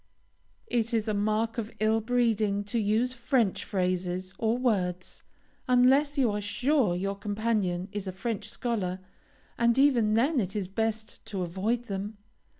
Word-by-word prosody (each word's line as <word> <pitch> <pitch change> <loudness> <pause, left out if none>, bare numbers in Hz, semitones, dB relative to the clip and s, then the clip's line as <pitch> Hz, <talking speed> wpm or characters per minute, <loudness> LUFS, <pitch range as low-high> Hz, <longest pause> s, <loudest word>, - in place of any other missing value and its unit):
It 230 -1 0
is 220 0 0
a 215 - +1
mark 215 +3 0
of 220 -1 -4
ill 220 +1 +2
breeding 220 -4 +1
to 220 +3 -2
use 220 +4 +1
French 235 -4 +1
phrases 185 -1 -2
or 225 +1 +1
words, 185 -8 -1 0.5
unless 265 +4 +4
you 250 -5 +3
are 205 0 -2
sure 245 -1 +1
your 195 +2 -1
companion 205 -3 -1
is 205 -2 -4
a - - -2
French 200 +3 -4
scholar, 205 -7 -2 0.6
and, 235 +1 +3
even 240 -6 +4
then, 270 +5 +3
it 195 -2 -2
is 200 -3 -2
best 220 +2 -3
to 195 -4 -3
avoid 200 +8 -1
them. 205 0 -5
215 Hz, 150 wpm, -28 LUFS, 195-235 Hz, 0.6 s, unless